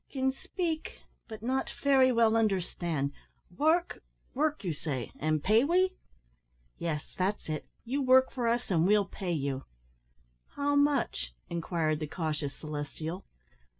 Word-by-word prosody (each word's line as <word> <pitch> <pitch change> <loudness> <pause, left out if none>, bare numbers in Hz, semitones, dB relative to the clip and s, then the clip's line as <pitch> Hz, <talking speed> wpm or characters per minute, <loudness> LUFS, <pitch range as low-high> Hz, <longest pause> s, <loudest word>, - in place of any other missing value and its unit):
"Kin 265 -1 +1
speek, 340 - -3 0.3
but 220 -1 -9
not 260 +3 0
fery 265 -2 +4
well 230 -2 +4
kin 225 - +3
on'erstan'. 175 -8 0 0.4
Work, 325 - +2 0.3
work 300 0 0
you 175 -4 -1
say, 135 -5 -4
an' 155 0 +1
pay 215 - +4
we?" 365 +5 +3 0.9
"Yes, 155 -3 -3
that's 190 +3 -1
it; 155 -1 -3 0.2
you 270 +5 -1
work 260 0 +5
for 245 -3 -1
us, 235 -2 0
and 170 -1 +3
we'll 205 0 +4
pay 190 -2 -4
you." 140 -4 -2 0.9
"How 285 0 +1
moche?" 275 - +1 0.2
inquired 165 -2 0
the 155 - -3
cautious 150 -3 -3
Celestial. 155 +4 -5
205 Hz, 140 wpm, -30 LUFS, -, 0.9 s, work